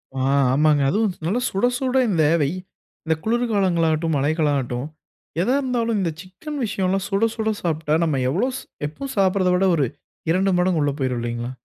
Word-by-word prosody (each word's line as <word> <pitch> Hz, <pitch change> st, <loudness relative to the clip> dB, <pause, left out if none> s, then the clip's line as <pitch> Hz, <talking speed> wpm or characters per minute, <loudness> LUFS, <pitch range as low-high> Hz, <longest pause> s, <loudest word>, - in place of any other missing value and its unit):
ஆ -, -, -3 dB, 0.3 s
ஆமாங்க. 150 Hz, 0 st, +3 dB
அதுவும் 210 Hz, +1 st, +1 dB
நல்ல 205 Hz, +9 st, +1 dB
சுட 195 Hz, +5 st, 0 dB
சுட 260 Hz, 0 st, 0 dB
இந்த 165 Hz, -5 st, +2 dB, 0.2 s
வெய் 145 Hz, +4 st, 0 dB, 0.5 s
இந்த 160 Hz, 0 st, +1 dB
குளிர்காலங்களாகட்டும் 180 Hz, -9 st, +1 dB
மழைகளாகட்டும் 140 Hz, -3 st, 0 dB, 0.5 s
எதா 245 Hz, +9 st, +2 dB
இருந்தாலும் 235 Hz, -4 st, 0 dB
இந்த 170 Hz, -, 0 dB
சிக்கன் 195 Hz, +11 st, -8 dB
விஷயம்லாம் 195 Hz, -1 st, -1 dB
சுட 200 Hz, +3 st, +2 dB
சுட 220 Hz, -1 st, -1 dB
சாப்பிட்டா, 160 Hz, -3 st, -1 dB
நம்ம 150 Hz, -5 st, 0 dB
எவ்வளவு 250 Hz, -, -1 dB, 0.3 s
எப்பவும் 265 Hz, -, -7 dB
சாப்பிடுவதை 190 Hz, -1 st, +3 dB
விட 190 Hz, +2 st, +2 dB
ஒரு 145 Hz, -4 st, +2 dB, 0.5 s
2 190 Hz, +2 st, +2 dB
மடங்கு 180 Hz, -2 st, +2 dB
உள்ள 145 Hz, -, +1 dB
போய்டும் 130 Hz, -2 st, -1 dB
இல்லீங்களா. 120 Hz, +1 st, -4 dB
180 Hz, 155 wpm, -22 LUFS, 150-215 Hz, 0.5 s, ஆமாங்க